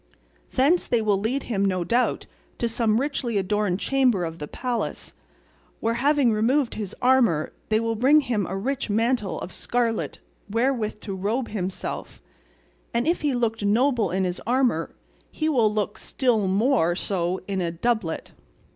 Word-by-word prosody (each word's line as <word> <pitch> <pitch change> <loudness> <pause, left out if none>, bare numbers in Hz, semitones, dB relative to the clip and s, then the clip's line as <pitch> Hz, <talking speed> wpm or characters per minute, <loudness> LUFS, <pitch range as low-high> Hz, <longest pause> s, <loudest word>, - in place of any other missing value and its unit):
Thence 310 +7 +3
they 235 - +2
will 210 -3 +1
lead 245 +7 -1
him, 200 -5 -1
no 185 -2 +1
doubt, 240 +7 +1 0.3
to 235 - 0
some 225 -1 +1
richly 260 -5 -1
adorned 200 -1 0
chamber 250 -10 +2
of 165 0 -6
the 150 - -5
palace, 245 - -3 0.7
where, 230 +1 0
having 280 -4 +3
removed 245 +5 +2
his 210 -2 -5
armour, 240 -12 +3 0.2
they 215 0 +3
will 230 0 0
bring 275 +7 +5
him 230 -8 -1
a 190 - -3
rich 265 +5 -2
mantle 215 -5 0
of 180 - -7
scarlet 235 -2 -1 0.3
wherewith 230 -1 0
to 200 - -5
robe 215 +7 -1
himself, 190 -3 -4 0.8
and 235 +2 +2
if 340 - +1
he 290 -4 +1
looked 225 -3 -1
noble 230 0 +2
in 190 +2 0
his 180 -1 -2
armour 245 -10 +1 0.3
he 310 - -2
will 240 -9 +3
look 210 -1 -2
still 235 -7 +1
more 195 -3 +2
so 180 -1 -1
in 195 -2 -1
a 170 - 0
doublet. 175 0 -2
225 Hz, 160 wpm, -25 LUFS, 195-250 Hz, 0.8 s, bring